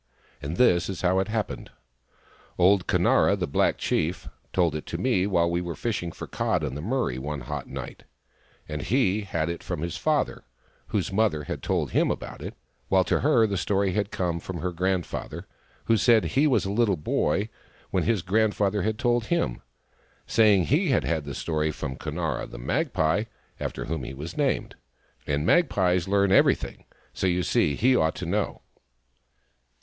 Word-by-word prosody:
And 75 +5 -4
this 90 -8 +4
is 95 -2 -5
how 90 +1 +3
it 95 - 0
happened. 110 -1 -3 0.9
Old 95 +1 +4
Conara, - - +3
the - - -1
black - - +1
chief, 85 +3 -1 0.2
told 85 -4 +2
it 75 - -5
to - - -4
me 95 +1 +1
while 85 -4 +2
we 85 +1 0
were 85 -1 -4
fishing 100 -7 -2
for - - -8
cod - - -1
in - - -2
the 75 - -5
Murray 110 - -1
one 75 +1 -4
hot - - -5
night; 65 -2 -8 0.6
and 75 -1 -4
he 110 -4 +1
had 85 -5 -2
it 85 0 -4
from - - -4
his 85 -1 -3
father, - - 0 0.4
whose 100 -2 -2
mother 100 -8 +1
had - - -5
told - - -1
him - - +2
about - - -5
it; - - -7 0.3
while 95 -1 +4
to 85 - +1
her 130 -6 +4
the 100 -2 -1
story 100 +1 +1
had 100 +1 -1
come 85 -4 -2
from 90 +1 -6
her 90 - -1
grand 90 +1 0
father, - - -6 0.4
who 115 - +4
said 115 0 +4
he 145 +3 +2
was 130 - +2
a 95 - -2
little 105 -3 +2
boy 75 +6 0 0.4
when - - +1
his 110 -6 +1
grand 105 +3 +2
father 100 0 +1
had 110 +3 -1
told 120 -2 +1
him, 115 - -1 0.6
saying 105 -5 +4
he 155 - +2
had 130 - +2
had 80 -3 -1
the 70 -2 -6
story 80 -1 -1
from 65 -3 -4
Conara, - - -3
the - - -9
magpie, 95 - 0 0.3
after - - -4
whom - - -3
he 65 - -6
was 80 +6 -7
named. 140 -5 0 0.5
And 75 0 0
the - - -3
magpies 90 - +3
learn 100 0 +2
everything, 100 - +2 0.3
so 95 - -1
you 90 0 +1
see 75 -2 +2
he 130 - +3
ought 80 -8 +2
to 90 - -5
know. 100 +4 -2
95 Hz, 185 wpm, -26 LUFS, 85-110 Hz, 0.9 s, this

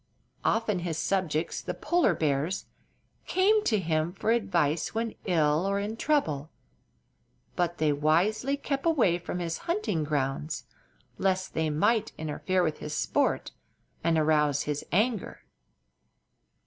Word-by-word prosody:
Often 220 -4 +1
his 170 -2 -3
subjects, 165 -2 -1
the - - -4
polar 345 0 +2
bears, 155 +4 0 0.6
came 415 +3 +3
to 220 - +3
him 165 -2 0
for 215 +3 0
advice 175 -8 +1
when 225 0 -1
ill 160 -1 +2
or 200 - +1
in 210 +2 -3
trouble; 160 - 0 1.1
but 175 -1 0
they 155 -2 +2
wisely 190 - +2
kept 275 +2 -2
away 225 - +3
from 175 +1 -5
his 170 -2 -3
hunting 340 - 0
grounds, 150 +1 -2 0.6
lest 190 -1 0
they 160 -1 0
might 205 +9 +1
interfere 175 +4 -1
with 155 -3 -1
his 150 0 -5
sport - - 0 0.5
and 165 -1 +2
arouse 150 -2 +2
his 150 -1 -3
anger. 215 +2 0
175 Hz, 130 wpm, -28 LUFS, 155-215 Hz, 1.1 s, came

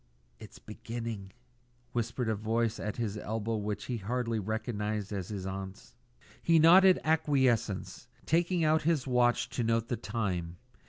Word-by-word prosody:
"It's - - -12
beginning," 115 -4 -6 0.6
whispered 120 +1 -2
a 110 - +2
voice 110 +2 -1
at 105 +1 -4
his 110 -3 -2
elbow 110 +1 -2
which 105 0 -3
he 125 - -3
hardly 115 +2 -2
recognised 105 -1 -3
as 95 -3 -3
his 100 -3 -5
aunt's. 95 -8 -7 0.5
He 165 -1 +4
nodded 180 +4 +7
acquiescence, 135 -10 +1 0.2
taking 170 +1 +2
out 155 0 +3
his 155 -4 +1
watch 125 -2 +2
to 120 - -2
note 115 0 0
the 120 - -1
time. 90 -6 -3
115 Hz, 145 wpm, -30 LUFS, 105-125 Hz, 0.6 s, nodded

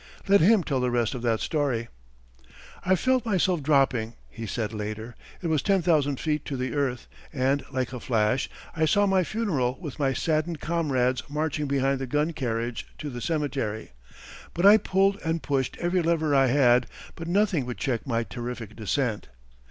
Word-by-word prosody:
Let 200 +1 +5
him 200 +2 +5
tell 135 -5 -1
the 125 0 +1
rest 120 -2 0
of 125 - -5
that 115 -2 0
story: 135 -7 -1 1.0
I 190 - +3
felt 255 +4 +1
myself 185 -6 +1
dropping 135 -6 +2 0.2
[he 115 -1 -7
said 110 +1 -3
later]. 110 +2 -5 0.3
It - - -1
was 155 -3 +1
ten 195 -3 +2
thousand 145 -5 +2
feet 150 -2 -1
to 135 - -4
the 125 0 -3
earth, 135 -4 -1 0.2
and, 135 0 +1
like 130 -1 -2
a 125 - -5
flash, 115 +1 +1 0.3
I 160 -1 +2
saw 205 +6 +3
my 190 -2 +3
funeral 155 - -1
with 155 -5 -7
my 135 -2 +2
saddened 155 +2 -1
comrades 135 -7 0
marching 150 0 -1
behind 135 0 +1
the 135 - -4
gun 150 +5 0
carriage 120 -5 -3
to 145 - -5
the 120 -1 -6
cemetery. 135 - -2 0.6
But 175 - +1
I 205 +2 +9
pulled 195 -1 +1
and 160 -2 -1
pushed 135 -2 -1
every 175 +1 +1
lever 160 -3 +1
I 135 -1 +5
had, 125 -2 +4 0.3
but 165 - -8
nothing 180 -7 +1
would 125 - -5
check 130 -1 -2
my 115 -2 0
terrific 120 -2 -6
descent. 110 +1 -1
140 Hz, 180 wpm, -26 LUFS, 125-165 Hz, 1.0 s, I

